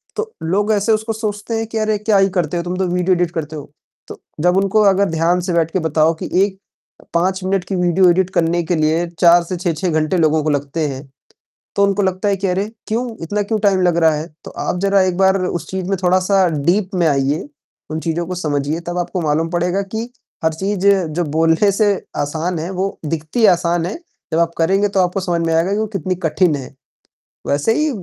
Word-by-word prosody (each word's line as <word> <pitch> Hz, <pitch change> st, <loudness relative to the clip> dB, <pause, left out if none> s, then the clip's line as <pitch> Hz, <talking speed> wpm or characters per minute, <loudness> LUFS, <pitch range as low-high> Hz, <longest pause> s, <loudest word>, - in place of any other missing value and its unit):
तो 440 Hz, 0 st, -4 dB
लोग 200 Hz, +6 st, +1 dB
ऐसे 210 Hz, +2 st, +1 dB
उसको 220 Hz, +1 st, 0 dB
सोचते 215 Hz, 0 st, -4 dB
हैं 225 Hz, -, -2 dB
कि 225 Hz, -, -5 dB
अरे! 215 Hz, -1 st, +1 dB
क्या 210 Hz, 0 st, +2 dB
ही 195 Hz, 0 st, +4 dB
करते 175 Hz, -2 st, -1 dB
हो, 170 Hz, -, -2 dB
तुम 180 Hz, +1 st, -4 dB
तो 190 Hz, 0 st, 0 dB
वीडियो 180 Hz, +1 st, +1 dB
एडिट 175 Hz, -1 st, 0 dB
करते 160 Hz, -2 st, -5 dB
हो। 145 Hz, -1 st, -9 dB, 0.4 s
तो -, -, -10 dB, 0.2 s
जब 180 Hz, +2 st, +3 dB
उनको 195 Hz, +2 st, +3 dB
अगर 200 Hz, 0 st, +3 dB
ध्यान 165 Hz, +2 st, +1 dB
से 180 Hz, 0 st, -2 dB
बैठ 165 Hz, -1 st, +1 dB
के 185 Hz, -, 0 dB
बताओ 160 Hz, 0 st, +2 dB
कि -, -, -4 dB, 0.2 s
1 195 Hz, -1 st, -7 dB, 0.6 s
5 185 Hz, +3 st, 0 dB
मिनट 190 Hz, 0 st, 0 dB
की 195 Hz, -, -3 dB
वीडियो 180 Hz, +1 st, +3 dB
एडिट 180 Hz, +1 st, +2 dB
करने 175 Hz, -1 st, +1 dB
के 175 Hz, +2 st, -1 dB
लिए 160 Hz, +2 st, +1 dB
4 170 Hz, 0 st, +6 dB
से 180 Hz, +2 st, -5 dB
6-6 175 Hz, 0 st, -1 dB
घंटे 155 Hz, +3 st, +1 dB
लोगों 155 Hz, -2 st, +2 dB
को 155 Hz, -, 0 dB
लगते 145 Hz, +2 st, -1 dB
हैं, 135 Hz, 0 st, -6 dB, 0.7 s
तो 200 Hz, -, +3 dB
उनको 200 Hz, 0 st, +2 dB
लगता 190 Hz, +2 st, 0 dB
है 200 Hz, -, +2 dB
कि 195 Hz, +1 st, -2 dB
अरे! 195 Hz, +3 st, -1 dB, 0.2 s
क्यों? 235 Hz, +3 st, -1 dB, 0.2 s
इतना 205 Hz, +6 st, -1 dB
क्यों 215 Hz, +2 st, -1 dB
टाइम 200 Hz, -2 st, +2 dB
लग 175 Hz, -2 st, +2 dB
रहा 160 Hz, -1 st, +5 dB
है? 155 Hz, +2 st, -4 dB, 0.2 s
तो -, -, -9 dB
आप -, -, -3 dB
जरा 200 Hz, 0 st, +3 dB
एक 185 Hz, -1 st, 0 dB
बार 190 Hz, 0 st, +4 dB
उस 170 Hz, -3 st, -3 dB
चीज़ 190 Hz, -1 st, -3 dB
में 195 Hz, -, 0 dB
थोड़ा-सा 185 Hz, +1 st, +3 dB, 0.2 s
डीप 185 Hz, +3 st, +2 dB
में 175 Hz, -2 st, +2 dB
आइए, 140 Hz, +1 st, 0 dB, 0.4 s
उन 155 Hz, -, -2 dB
चीज़ों 165 Hz, +1 st, -2 dB
को 180 Hz, -, -4 dB
समझिए 150 Hz, -2 st, -1 dB
तब 175 Hz, 0 st, -3 dB
आपको 180 Hz, +1 st, -2 dB
मालूम 160 Hz, +1 st, 0 dB
पड़ेगा 175 Hz, +3 st, 0 dB
कि 225 Hz, +2 st, -3 dB, 0.3 s
हर 160 Hz, 0 st, +2 dB
चीज़ 195 Hz, +3 st, -1 dB
जो 175 Hz, -4 st, +2 dB
बोलने 165 Hz, +5 st, +3 dB
से 205 Hz, +1 st, +2 dB, 0.2 s
आसान 160 Hz, +4 st, -2 dB
है, 165 Hz, +3 st, -4 dB
वो 190 Hz, +1 st, -3 dB
दिखती 160 Hz, +9 st, 0 dB
आसान 170 Hz, -1 st, 0 dB
है, 180 Hz, -, -4 dB, 0.4 s
जब 160 Hz, -, +2 dB
आप 170 Hz, 0 st, +2 dB
करेंगे 195 Hz, +5 st, +2 dB
तो 195 Hz, -, 0 dB
आपको 180 Hz, +1 st, +1 dB
समझ 175 Hz, -2 st, -1 dB
में 165 Hz, -, +1 dB
आएगा 165 Hz, +4 st, +2 dB
कि -, -, 0 dB
वो 220 Hz, -, 0 dB
कितनी 185 Hz, 0 st, -1 dB
कठिन 160 Hz, +1 st, +2 dB
है। 135 Hz, -2 st, -8 dB, 0.7 s
वैसे 145 Hz, +10 st, +1 dB
ही 305 Hz, +5 st, +1 dB
180 Hz, 225 wpm, -18 LUFS, 165-195 Hz, 0.7 s, 4